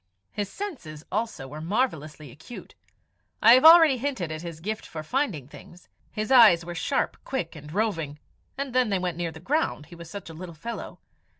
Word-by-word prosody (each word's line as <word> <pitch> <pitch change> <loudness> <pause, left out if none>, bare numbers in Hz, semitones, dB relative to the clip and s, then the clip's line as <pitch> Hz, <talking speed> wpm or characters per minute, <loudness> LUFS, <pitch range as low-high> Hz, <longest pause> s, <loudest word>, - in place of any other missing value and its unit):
His 205 -2 -3
senses 175 - -7
also 215 -10 -3
were 150 +3 -8
marvellously 155 - -2
acute. 155 - -12 0.7
I 230 - +8
have 255 - +6
already 320 -4 +8
hinted 240 - -3
at 155 0 -5
his 170 -2 -8
gift 215 +6 -4
for 155 -1 -8
finding 190 - -2
things. 175 +4 -15 0.2
His 215 +4 -4
eyes 215 -10 +7
were 175 - -6
sharp, 180 +11 -1
quick, 220 -13 -4
and 150 -1 -10
roving, 165 -7 -2 0.4
and 275 -2 -4
then 255 -3 +2
they 195 - +1
went 180 -2 -2
near 170 -1 -2
the 160 - -11
ground 260 - -1
he 170 - -13
was 170 -1 -11
such 200 +2 -8
a 165 - -9
little 170 +1 -9
fellow. 230 +10 -7
180 Hz, 190 wpm, -26 LUFS, 155-245 Hz, 0.7 s, I